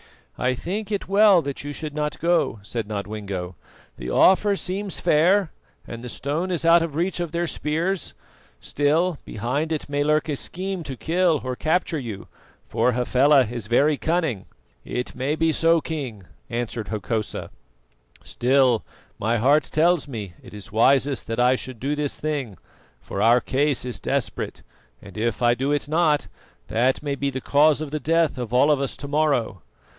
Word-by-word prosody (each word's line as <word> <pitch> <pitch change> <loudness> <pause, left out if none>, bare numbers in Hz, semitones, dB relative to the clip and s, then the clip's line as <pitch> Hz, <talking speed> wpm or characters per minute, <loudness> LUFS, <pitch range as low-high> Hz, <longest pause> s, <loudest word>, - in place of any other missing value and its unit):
"I 125 0 0
think 195 - -4
it 205 - -2
well 200 -3 +5
that 140 -1 -5
you 145 - -5
should 150 0 -6
not 150 0 -3
go," 170 -7 +1
said 110 +1 -4
Nodwengo. 100 -3 -5 0.4
"The - - -6
offer 200 +2 +4
seems 195 +1 -4
fair, 180 +4 +3 0.3
and 115 +1 -8
the 125 - -6
stone 150 +9 -3
is 170 -3 -2
out 165 0 +6
of 165 -3 -3
reach 175 +3 -1
of 170 -3 -3
their 170 +1 -1
spears; 165 +4 -2 0.4
still, 155 +3 +1
behind 130 +9 -2
it 155 - -2
may 145 0 0
lurk 150 +1 +2
a 150 - -1
scheme 185 +5 -4
to 135 -3 -6
kill 170 -1 +1
or 130 0 -3
capture 160 +2 0
you, 110 -7 -7 0.4
for 125 +2 +1
Hafela 130 +3 +4
is 115 -1 -6
very 145 +6 +3
cunning." 160 - -1 0.4
"It 125 - -4
may 135 +4 -1
be 160 0 +2
so, 165 +1 +3
King," 135 - -5 0.3
answered 115 -2 -3
Hokosa; 110 0 -3 0.7
"still, 125 -2 +2 0.4
my 115 +3 +1
heart 140 +6 +3
tells 165 0 +2
me 105 -9 -6
it - - -12
is 105 - -10
wisest 135 +4 +2
that 115 +1 -3
I 125 +1 +5
should 130 -2 -5
do 140 +5 -1
this 150 -1 -3
thing, 140 - -3 0.4
for 100 - -5
our 120 +3 +5
case 140 -1 0
is 120 -6 -5
desperate, - - -3 0.4
and 100 -3 -13
if 115 +1 -1
I 120 0 +5
do 135 +4 -1
it 145 -1 0
not, 155 -1 +2 0.4
that 125 +5 +1
may 145 -1 -1
be 140 0 -1
the 130 -1 -4
cause 150 +1 +3
of 155 -3 -5
the 155 - -2
death 165 -3 +1
of 120 -3 -4
all 130 +5 +4
of 145 -2 +2
us 135 - -3
to 140 - -7
morrow. 140 - 0
145 Hz, 175 wpm, -23 LUFS, 120-160 Hz, 0.7 s, out